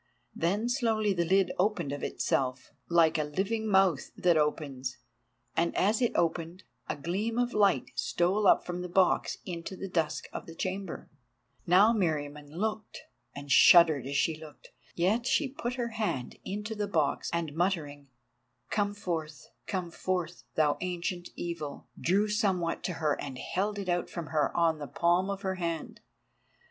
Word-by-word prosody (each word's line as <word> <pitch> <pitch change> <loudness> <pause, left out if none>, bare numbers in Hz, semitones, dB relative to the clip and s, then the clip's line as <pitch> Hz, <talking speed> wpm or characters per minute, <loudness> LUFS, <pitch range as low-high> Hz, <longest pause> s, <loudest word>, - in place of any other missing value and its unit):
Then 200 +8 0
slowly 225 -5 +1
the 170 -2 0
lid 190 +1 +3
opened 180 -7 +1
of 145 - -4
itself, 130 -1 -1 0.2
like 165 -2 +4
a - - +2
living 200 +9 -2
mouth 190 -7 +3
that 175 -2 +3
opens, 140 -4 -1 0.6
and 170 0 +1
as 210 +5 +2
it 240 - +3
opened, 170 +2 -1 0.3
a - - -1
gleam 195 +10 -2
of 245 0 +1
light 200 -3 +2
stole 190 +4 +1
up - - +5
from 180 0 -4
the 180 - -5
box 185 +1 +2
into 175 +1 -5
the 195 - -6
dusk 165 -4 -1
of - - -6
the 165 - -9
chamber. 190 0 -4 0.6
Now 195 +6 +6
Meriamun 150 -7 -1
looked, 215 +6 -4 0.3
and 140 0 -7
shuddered 155 -4 +7
as 140 - -4
she 160 - +2
looked. 155 -1 -13 0.3
Yet 210 +8 +1
she 290 - +2
put 250 -2 -4
her 240 -2 -2
hand 215 - -3
into 210 +3 -4
the 210 -1 -2
box, 160 -7 0
and 170 -3 -2
muttering 155 -5 -1 0.6
"Come 205 -1 0
forth—come 170 0 -5
forth, 175 -1 -3
thou 150 -2 +2
Ancient 175 0 -3
Evil," 165 -4 -5
drew 200 +5 +2
somewhat 195 -6 0
to 180 - -1
her 155 -3 -1
and 135 -3 -6
held 200 +9 -2
it 200 -2 -4
out 175 0 0
from 170 -3 -6
her 150 -2 +1
on 165 -2 +3
the 145 - -5
palm 175 +7 +2
of 200 0 -4
her 190 -1 -1
hand. 165 -2 -3
175 Hz, 160 wpm, -30 LUFS, 155-200 Hz, 0.6 s, shuddered